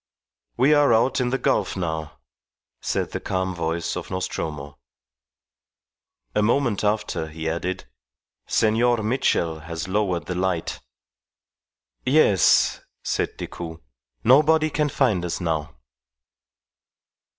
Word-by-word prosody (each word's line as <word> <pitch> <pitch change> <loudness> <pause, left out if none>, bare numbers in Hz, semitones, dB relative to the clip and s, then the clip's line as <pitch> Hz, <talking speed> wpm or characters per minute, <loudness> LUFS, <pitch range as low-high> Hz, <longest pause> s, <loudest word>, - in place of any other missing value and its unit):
"We 135 +5 +5
are 145 -3 +5
out 125 +3 +2
in 125 - +1
the 135 - 0
gulf 120 -9 0
now," 80 -3 -3 0.6
said - - -2
the - - -3
calm 95 0 -2
voice 85 -1 -2
of - - -6
Nostromo. 75 -7 -4 1.5
A - - +2
moment 120 0 +1
after 105 -6 -1
he 80 +1 -6
added, 90 +2 -3 0.6
"Senor 115 +1 +2
Mitchell 105 -9 0
has 80 +1 -6
lowered 95 -5 0
the 90 - -3
light." 90 -2 -1 1.2
"Yes," 130 - +4 0.2
said - - -2
Decoud; 80 -1 -7 0.4
"nobody 155 +5 +5
can 150 0 +1
find 120 -10 +1
us 85 - -3
now." 80 -6 -2
95 Hz, 110 wpm, -24 LUFS, 80-125 Hz, 1.5 s, We